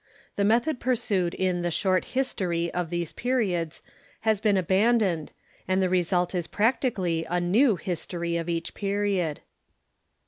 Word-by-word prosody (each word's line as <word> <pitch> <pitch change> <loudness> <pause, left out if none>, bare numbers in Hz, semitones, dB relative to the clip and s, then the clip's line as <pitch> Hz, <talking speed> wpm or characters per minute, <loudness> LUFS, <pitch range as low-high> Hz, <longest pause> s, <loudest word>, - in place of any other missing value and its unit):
The 200 - +1
method 240 +7 +2
pursued 205 -8 0
in 185 -2 0
the 175 - 0
Short 185 +2 +1
Histor}^ 180 -10 0
of 175 -2 -2
these 175 -2 -3
periods 190 -11 -1 0.4
has 220 -2 +1
been 210 -3 +3
abandoned, 190 -2 +2 0.4
and 185 0 +2
the 185 -1 +2
result 180 0 +1
is 175 -3 -2
practically 205 -7 0
a 175 +1 +1
new 210 +7 +3
History 170 0 -3
of 170 0 -2
each 165 -1 -2
period. 200 -6 -1
185 Hz, 140 wpm, -26 LUFS, 175-210 Hz, 0.4 s, been